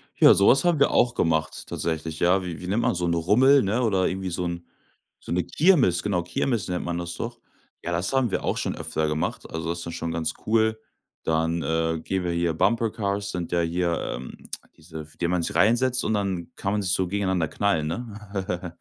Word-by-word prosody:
Ja, - - +8
sowas 125 +7 +5
haben 170 -4 +3
wir 140 - +4
auch 120 -1 +3
gemacht 80 -6 0
tatsächlich. 80 -1 -3
Ja, 90 +2 +3
wie 85 -3 -5
wie 90 - -7
nennt 105 +5 +1
man, - - +1
so 90 0 -1
'n 85 - +1
Rummel, 125 +12 +5
ne? 105 +5 0
Oder 95 -5 +2
irgendwie 95 0 -3
so 90 +1 -2
'n 85 0 -4 0.6
so - - -6
'ne 90 +1 +2
Kirmes, 125 - +3
genau 95 -4 0
Kirmes 95 +4 -1
nennt 90 -1 -2
man 85 0 -2
das 85 0 -5
doch. 120 +5 -6 0.4
Ja, 90 - -3
das 85 +6 -1
haben 130 -4 +2
wir - - -2
auch - - 0
schon - - -2
öfter 80 - -2
gemacht. 75 +1 -2
Also, 80 0 -3
das 85 0 -4
ist 85 - -5
schon 85 - -3
ganz 80 -1 -2
cool. 110 0 +2 0.4
Dann, 80 +1 0
äh, 80 0 0
gehen 95 +1 -2
wir 85 - -1
hier 85 0 +1
Bumper 110 +7 +2
Cars, 100 -1 -2
sind 90 -3 -4
ja 85 - +2
hier, 85 +1 0 0.2
ähm, 65 +1 -8 0.4
diese 80 0 -9
f 75 0 -11
in - - -31
denen 85 0 0
man 90 -1 +1
sich - - -3
reinsetzt 125 +3 +3
und 110 - 0
dann 95 -4 -2
kann 95 - -2
man 105 0 0
sich 95 -1 0
so 95 -1 +1
gegeneinander 95 -3 0
knallen, 80 -6 0
ne? 100 -3 -5
90 Hz, 225 wpm, -25 LUFS, 85-105 Hz, 0.6 s, Ja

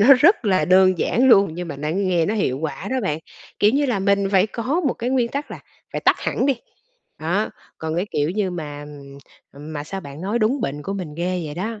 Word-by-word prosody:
nó 215 - +5
rất 330 - +5
là 190 -2 +3
đơn 185 -1 +5
giản 260 +3 +2
luôn 200 -5 +6
nhưng 175 -1 -5
mà 145 - -5
nó 150 +2 -3
nghe 180 -2 +1
nó 215 - 0
hiệu 135 -11 0
quả 155 -1 -4
đó 260 - 0
bạn. 155 -5 -1 0.4
Kiểu 210 - +5
như 285 +1 +2
là, 235 -6 0
mình 200 0 +2
phải 190 +2 +5
có 255 +10 -1
một - - -1
cái 245 +2 -3
nguyên 250 -3 +2
tắc 280 +3 -4
là - - -7 0.3
phải - - -2
tắt - - +4
hẳn 265 - 0
đi. 275 - +3 0.7
Đó, 180 +7 0 0.3
còn 160 +1 -3
cái, 185 +4 0
kiểu 150 +2 0
như, 200 -1 -1
mà, 150 -4 -6 0.7
ừm, 150 +3 -10
mà 145 0 -4
sao 195 +4 -5
bạn 140 -2 -10
nói 205 +5 -1
đúng 235 +5 +1
bệnh 145 -2 -3
của 195 - -4
mình 180 -7 -5
ghê 180 0 -1
vậy 145 - -6
đó, 215 +4 -4
190 Hz, 245 wpm, -22 LUFS, 160-220 Hz, 0.7 s, luôn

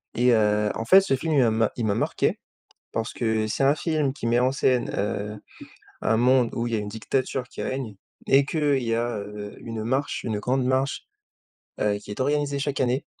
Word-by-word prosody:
et 125 +1 +4
heu, 105 -1 +2
en 115 - -3
fait, 190 +11 +8
ce 190 -8 +1
film, 160 +4 -2
il 145 - +4
m 110 -2 +2
il 120 - -2
m'a 100 -2 +1
marqué, - - 0 0.5
parce 115 -1 -3
que 110 -2 0
c'est 110 - -1
un 140 +2 +4
film 155 -4 0
qui 130 -4 -5
met 120 +1 +3
en 130 +1 +2
scène, 130 -2 +1
heu, 105 +1 -2 0.6
un 110 - +2
monde 125 0 +3
où 115 - -1
il 120 - -4
y - - +2
a - - -1
une 105 - -5
dictature 125 +4 -2
qui - - -7
règne 130 -5 -4 0.3
et 135 +1 +5
qu'il 145 -3 +1
y 115 -1 0
a, 120 -1 -1
heu, 105 0 -7
une 115 -2 -5
marche, 135 +5 -1
une 110 -3 -2
grande 130 +3 0
marche, 130 +2 0 0.7
heu, 105 -1 +2
qui 105 - -12
est 105 - -6
organisée 145 +1 0
chaque 140 0 -2
année 130 +2 0
120 Hz, 215 wpm, -25 LUFS, 110-135 Hz, 0.7 s, fait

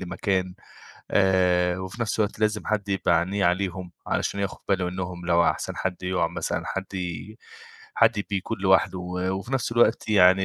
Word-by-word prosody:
لمكان 95 0 -1 0.6
آآ 90 -2 +3
وفي 95 +5 -7
نَفْس 115 - -2
الوقت 105 -1 0
لازم 105 -1 0
حد 105 -2 -1
يبقى 95 -3 +2
عينيه 95 +4 -1
عليهم 90 0 0 0.2
علشان 100 - -1
ياخُد 100 -1 -3
باله 95 -2 +1
إنّهم 90 -1 -5
لو 85 0 +4
أحسن - - -1
حد 95 -1 -3
يُقع 90 -2 +1
مثلًا - - -3
حد 95 +1 -5
ي 90 +3 -5 0.6
حد 115 -2 +3
بيكون 95 -2 -2
لوحده 95 -1 +3
و 90 0 -5
وفي 95 +7 -4
نَفْس 130 -3 0
الوقت 120 -1 +3
يعني 95 -2 +5
95 Hz, 165 wpm, -25 LUFS, 90-100 Hz, 0.6 s, يعني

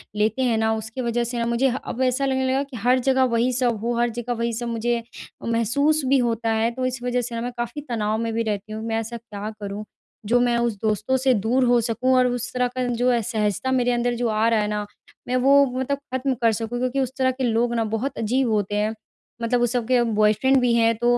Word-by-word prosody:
लेते 220 +4 +1
हैं 235 -3 +2
ना 220 0 +1
उसकी 220 +4 -5
वजह 240 0 0
से 240 +1 -4
ना 230 - 0
मुझे 235 +3 +2
ह 250 - -2
अब 255 - -4
ऐसा 255 +2 +1
लगने 265 -1 0
लगा 270 +1 +1
कि 270 -4 -9
हर 250 +4 +3
जगह 265 +1 +2
वही 240 0 +2
सब 240 -3 +1
हो। 240 0 0
हर 240 0 +2
जगह 240 +1 -4
वही 235 0 -1
सब 240 +1 -3
मुझे 235 +1 -1 0.4
महसूस 260 +7 +2
भी 275 +1 +4
होता 230 -2 0
है 225 +1 +2
तो 255 +1 -3
इस 255 -1 -3
वजह 250 0 0
से 235 0 -5
ना 230 - -3
मैं 245 +1 -3
काफ़ी 240 +5 -4
तनाव 215 -2 -1
में 230 0 -2
भी 230 0 0
रहती 210 0 -3
हूँ। 220 - -5
मैं 225 - -1
ऐसा 230 +1 -5
क्या 215 -2 -7
करूँ 205 +1 -5 0.4
जो 240 +3 +3
मैं 240 -1 +2
उस 235 -1 +1
दोस्तों 215 +4 +1
से 260 0 +3
दूर 235 +4 +1
हो 245 0 +4
सकूँ 240 +3 0
और 255 0 +4
उस 245 0 -2
तरह 250 0 +1
का 255 +1 -3
जो 245 +1 +1
असहजता 220 +2 -1
मेरे 245 -1 +2
अंदर 240 0 0
जो 240 0 -1
आ 215 +1 +2
रहा 225 -2 +2
है 210 - -1
ना 210 0 -2 0.4
मैं 250 - 0
वो 275 +2 +5
मतलब 270 +2 -1 0.2
ख़त्म 260 +1 0
कर 230 -1 +4
सकूँ। 225 +3 -3
क्योंकि 255 +2 -1
उस 260 -2 0
तरह 260 -1 +2
के 260 0 -5
लोग 235 0 +1
ना 230 - +1
बहुत 255 +5 -2
अजीब 245 +3 +1
होते 205 -1 0
हैं 210 +1 0 0.5
मतलब 240 +1 +1
वो 240 - +3
सब 240 -1 -1
के 250 -1 +3
बॉयफ्रेंड 215 +4 +3
भी 245 -1 +2
हैं। 230 0 +4
तो 240 +1 +2
240 Hz, 250 wpm, -23 LUFS, 225-255 Hz, 0.5 s, वो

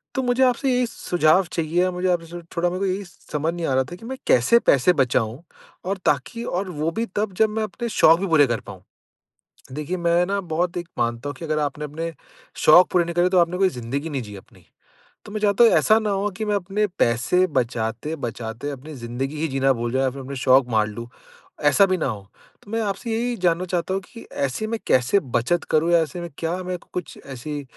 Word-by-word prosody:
तो 265 - 0
मुझे 245 +1 +1
आपसे 255 +2 +1
ये 250 - +2
सुझाव 175 -4 +2
चाहिए 165 +2 0
या 185 - +2
मुझे 180 +1 -1
आपसे 175 0 -2
स - - -16
थोड़ा 175 +1 +2
मेरे 180 +1 -3
को 195 - 0
यही 195 +1 -2
समझ 160 -2 -4
नहीं 170 -1 -3
आ 135 - 0
रहा 130 0 +3
था 175 - -7
कि 225 - -15
मैं 265 - -5
कैसे 130 - +5
पैसे 160 - +4
बचाऊँ? 125 -1 0 0.4
और 195 +2 -1
ताकि 150 - 0
और 185 -3 -2
वो 155 0 -2
भी 225 +6 -2
तब 205 -1 0
जब 220 - +6
मैं 220 +1 -2
अपने 235 +3 -5
शौक 165 -5 +5
भी 195 - -1
पूरे 155 -5 +5
कर 120 -2 -1
पाऊँ? 95 -3 -11 0.9
देखिए 150 +6 -3
मैं 170 0 +2
ना 200 0 -1
बहुत 175 +1 0
एक 175 -1 -4
मानता 120 +3 -1
हूँ 145 - -4
कि 165 - -9
अगर 155 -1 -1
आपने 150 0 -2
अपने 165 +3 -5 0.5
शौक 175 +4 +7
पूरे 175 -2 +3
नहीं 170 - -5
करे 175 +1 +3
तो 185 0 +2
आपने 175 +1 +2
कोई 190 -1 +4
ज़िंदगी 135 +2 -4
नहीं 135 -3 -3
जी 105 -2 -9
अपनी। 95 - -17 0.6
तो 210 - -11
मैं 215 - -3
चाहता 205 +2 +4
हूँ 230 - +7
ऐसा 220 +1 +4
ना 215 -2 -2
हो 200 +1 0
कि 220 - -3
मैं 210 -1 0
अपने 200 +2 0
पैसे 125 +11 +2
बचाते-बचाते 120 -1 -3
अपनी 145 +3 -8
ज़िंदगी 130 +3 -4
ही 160 - 0
जीना 135 0 +2
भूल 120 -1 -3
जाएँ 130 +1 +1
या 130 - +2
फिर 135 +1 -9
अपने 135 +1 -7
शौक 130 0 +4
मार 110 -1 +2
लूँ, 115 +2 -7 0.6
ऐसा 145 +7 +5
भी 185 -1 +1
ना - - -1
हो। 110 -5 -3 0.4
तो 205 - -15
मैं 225 - -1
आपसे 200 +3 -3
यही 240 +2 -1
जानना 180 -2 +1
चाहता 180 0 -2
हूँ 195 - -1
कि 230 - -13
ऐसे 140 +9 -2
में 225 +1 -2
कैसे 130 +11 +3
बचत 130 +6 -1
करूँ 160 +2 +2
या 170 - +6
ऐसे 175 +3 -5
में 170 - -5
क्या 165 +1 -1
मैं 180 0 -3 0.2
कुछ 180 -2 -6
ऐसी 140 +3 -6
165 Hz, 235 wpm, -23 LUFS, 135-190 Hz, 0.9 s, शौक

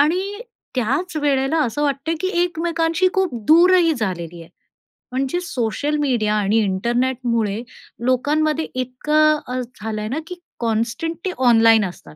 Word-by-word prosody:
आणि 370 +7 +1 0.4
त्याच 280 +9 -1
वेळेला 275 +2 +1
असं 270 +4 -2
वाटतंय 285 +3 -1
की 375 - 0
एकमेकांशी 335 +1 0
खूप 380 -7 0
दूर 345 +4 +6
ही 340 -3 +4
झालेली 175 - -4
आहे, 165 - -15 0.6
म्हणजे 270 +6 -1
सोशल 285 0 -2
मीडिया 225 -6 +1
आणि 210 +1 +1
इंटरनेटमुळे 235 +1 0 0.4
लोकांमध्ये 300 +5 +1
इतकं 300 +5 +2
अ, 250 +1 -3
झालं 220 -3 -6
आहे 215 - -4
ना 280 +6 -2
की 360 - -6 0.2
कॉन्स्टंटली 240 - -2 0.2
ऑनलाईन 225 -2 +5
असतात. 80 - -10
260 Hz, 135 wpm, -20 LUFS, 225-320 Hz, 0.6 s, दूर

